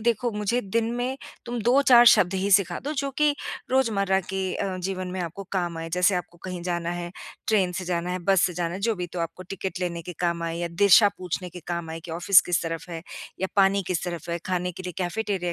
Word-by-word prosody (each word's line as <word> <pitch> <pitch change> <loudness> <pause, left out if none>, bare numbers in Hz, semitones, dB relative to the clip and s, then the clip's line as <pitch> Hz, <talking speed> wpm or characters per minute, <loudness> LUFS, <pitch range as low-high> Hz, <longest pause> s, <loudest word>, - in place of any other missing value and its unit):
देखो 235 +1 +1
मुझे 210 +4 0
दिन 225 +3 -1
में 250 +2 -2 0.3
तुम 240 -1 -3
2-4 245 0 +6
शब्द 190 -5 +6
ही 195 +2 0
सिखा 200 -1 +4
दो 295 - -2
जो 275 -1 -1
कि 300 -1 +4 0.4
रोज़मर्रा 200 -7 +2
के 190 0 -3
अ, 190 -2 -2
जीवन 185 0 -3
में 185 - -4
आपको 175 +3 -5
काम 175 -3 -1
आए। 165 - -5
जैसे 180 +3 +3
आपको 175 -1 -5
कहीं 180 -1 -5
जाना 175 -1 -2
है, 175 0 -4 0.4
ट्रेन 190 -5 +3
से 185 +1 -4
जाना 175 0 -2
है, 180 - -2
बस 190 +1 +3
से 180 - -4
जाना 170 0 -2
है, 195 - -5
जो 225 +2 +1
भी 180 -2 -4
तो 180 - -3
आपको 165 +2 -4
टिकट 190 -1 -4
लेने 170 -2 -2
के 180 +2 -7
काम 170 -1 0
आए 165 0 -2
या 175 0 -2
दिशा 200 +4 +6
पूछने 180 0 -4
के 180 +1 -9
काम 170 -2 -3
आए 165 0 -6
कि 165 - -10
ऑफिस 175 +3 +6
किस 175 - +2
तरफ 165 0 -5
है 165 -2 -6 0.4
या 190 - +1
पानी 195 0 +4
किस 180 -1 -1
तरफ 170 -2 -5
है, 170 - -1
खाने 180 -1 -1
के 185 - -9
लिए 180 -1 -5
कैफेटेरिया 185 -1 -2
185 Hz, 240 wpm, -25 LUFS, 175-200 Hz, 0.4 s, 2-4